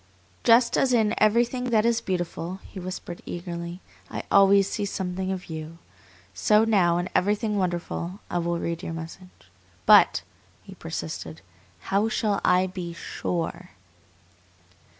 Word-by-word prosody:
"Just 235 Hz, +1 st, +5 dB
as 260 Hz, -2 st, +2 dB
in 220 Hz, -3 st, +3 dB
everything 240 Hz, +4 st, +2 dB
that 225 Hz, -3 st, +2 dB
is 230 Hz, -1 st, +2 dB
beautiful," 180 Hz, -1 st, -3 dB
he 190 Hz, -, -9 dB
whispered 180 Hz, -1 st, -7 dB
eagerly, 170 Hz, 0 st, -6 dB, 0.3 s
"I -, -, -5 dB
always 195 Hz, 0 st, +6 dB
see 205 Hz, -, -3 dB
something 190 Hz, -1 st, -3 dB
of 185 Hz, -1 st, -4 dB
you, 160 Hz, 0 st, -7 dB, 0.6 s
so 210 Hz, +1 st, +4 dB
now 190 Hz, -6 st, +3 dB
in 175 Hz, +1 st, -1 dB
everything 210 Hz, +2 st, +1 dB
wonderful 180 Hz, 0 st, -2 dB
I 175 Hz, -, -1 dB
will 170 Hz, 0 st, -1 dB
read 170 Hz, 0 st, -3 dB
your 165 Hz, -, -5 dB
message. 165 Hz, +3 st, -8 dB, 0.6 s
But," -, -, +6 dB, 0.4 s
he -, -, -11 dB
persisted, 80 Hz, 0 st, -6 dB, 0.5 s
"how 205 Hz, +3 st, +3 dB
shall 210 Hz, -2 st, 0 dB
I 180 Hz, +1 st, +4 dB
be 180 Hz, -2 st, -6 dB
SURE?" 175 Hz, +1 st, -4 dB
185 Hz, 135 wpm, -25 LUFS, 170-210 Hz, 0.6 s, always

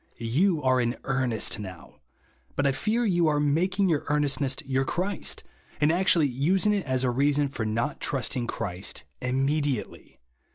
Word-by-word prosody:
You 150 Hz, -, +1 dB
are 130 Hz, -1 st, +3 dB
in 120 Hz, +1 st, -1 dB
earnest 130 Hz, -6 st, 0 dB
now; 95 Hz, -4 st, -10 dB, 0.6 s
but 145 Hz, -, 0 dB
I 140 Hz, -, +4 dB
fear 220 Hz, -, 0 dB
you 175 Hz, -5 st, +3 dB
are 150 Hz, -1 st, +2 dB
making 180 Hz, +7 st, +2 dB
your 155 Hz, -5 st, +1 dB
earnestness 145 Hz, -2 st, +1 dB
your 135 Hz, 0 st, +1 dB
Clirist, 185 Hz, +7 st, -3 dB, 0.4 s
and 150 Hz, +1 st, +4 dB
actually 175 Hz, -2 st, +3 dB
using 170 Hz, -, +2 dB
it 195 Hz, -7 st, -2 dB
as 130 Hz, 0 st, 0 dB
a 125 Hz, -, +2 dB
reason 140 Hz, +3 st, +2 dB
for 115 Hz, -5 st, -3 dB
not 115 Hz, +6 st, -1 dB
trusting 125 Hz, -2 st, -2 dB
Christ 90 Hz, -2 st, -4 dB, 0.2 s
immediately. 135 Hz, -1 st, -1 dB
140 Hz, 155 wpm, -27 LUFS, 125-165 Hz, 0.6 s, I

